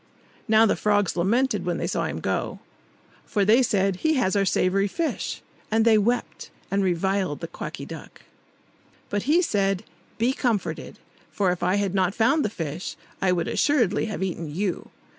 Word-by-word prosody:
Now 220 0 +6
the 215 - +2
frogs 205 -2 +1
lamented 235 +10 +1
when - - -1
they - - -2
saw - - -1
him - - -4
go, - - -2 0.6
for 205 -2 0
they 225 +6 +5
said, 195 -5 +1
"He 315 +8 +1
has 215 -7 +1
our 200 -1 +3
savoury 195 +2 +2
fish!" 325 - -3 0.3
And 220 +1 +2
they 225 -1 +6
wept, 240 +4 -1 0.2
and 195 0 +2
reviled 185 -2 0
the 165 - -5
Quacky 165 - -7
Duck. - - -10 0.9
But 205 +6 -2
he 345 +4 +5
said, 195 - 0 0.3
"Be 240 +3 +2
comforted! 235 -7 -2 0.3
for 195 -4 +1
if 180 - -4
I 180 +2 +2
had 200 -2 0
not 190 0 +1
found 275 +7 +3
the - - 0
fish, 165 -3 -5 0.2
I 190 - +2
should 175 -2 +1
assuredly 235 -9 +2
have 215 -3 -3
eaten 170 -4 -3
you. 180 +4 -3
200 Hz, 175 wpm, -25 LUFS, 185-225 Hz, 0.9 s, Now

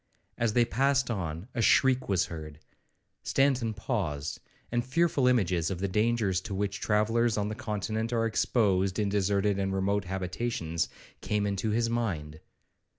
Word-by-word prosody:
As 115 -2 0
they 120 0 +4
passed 135 +1 +1
on, 85 -3 -4
a 120 - -1
shriek 130 +1 +3
was 95 -2 +2
heard. 75 -2 -8 0.6
Stanton 130 -5 +1
paused, 85 - -3 0.3
and 120 0 +1
fearful 140 0 +2
images 95 -10 +2
of 95 - -3
the 100 +3 -1
dangers 105 -2 +1
to 95 0 -5
which 100 0 -2
travellers 110 +2 +2
on 105 0 0
the - - -3
Continent 110 +1 -3
are 115 -1 +1
exposed 100 -4 +1
in 105 -2 +1
deserted 100 0 +1
and 95 0 -1
remote 100 +1 0
habitations, 90 -2 -2 0.3
came 105 -1 0
into 100 +2 -1
his 115 +2 +1
mind. 85 -11 -2
105 Hz, 155 wpm, -29 LUFS, 95-115 Hz, 0.6 s, they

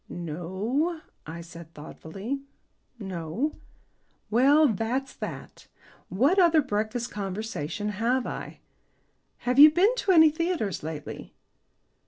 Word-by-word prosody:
"No," 190 - -2 0.3
I 165 +2 -7
said 170 -1 -12
thoughtfully; 195 - -6 0.6
"no." 190 - -3 0.8
"Well, 280 +7 +5
that's 235 +4 -2
that. - - -8 0.4
What 275 - +2
other 330 -4 +5
breakfast 220 +1 -2
conversation 205 -2 -4
have 235 +5 0
I? - - -7 0.8
Have 250 +2 +2
you 300 +2 +11
been 365 +9 +3
to 395 - +1
any 320 -3 +7
theatres 315 - -2
lately?" 155 -1 -7
225 Hz, 105 wpm, -26 LUFS, 180-295 Hz, 0.8 s, you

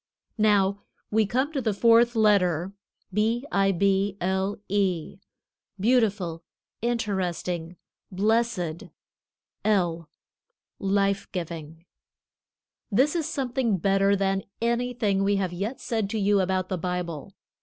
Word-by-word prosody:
Now, 200 -2 +3 0.3
we 215 -1 +3
come 260 +8 0
to 275 - -1
the 220 -4 0
fourth 235 +2 +5
letter, 195 -5 +2 0.4
B 225 +5 +1
I 195 0 +3
B 195 +1 +1
L 190 +2 -1
E. 190 -4 -1 0.6
Beautiful, 200 -7 +1 0.4
Interesting, 180 -7 -2 0.4
Blessed, 200 -4 0 0.8
L, 175 -6 +1 0.7
Life 195 0 0
giving. 165 -2 -6 1.1
This 270 - +3
is 320 -2 -1
something 255 -7 0
better 195 +2 +3
than 195 0 0 0.2
anything 235 -4 0
we 200 +1 +2
have 190 -3 -1
yet 205 +8 -4
said 220 -5 -2
to 220 - -2
you 205 0 +3
about 185 0 0
the 185 - -2
Bible. 180 -1 -4
195 Hz, 110 wpm, -26 LUFS, 185-225 Hz, 1.1 s, fourth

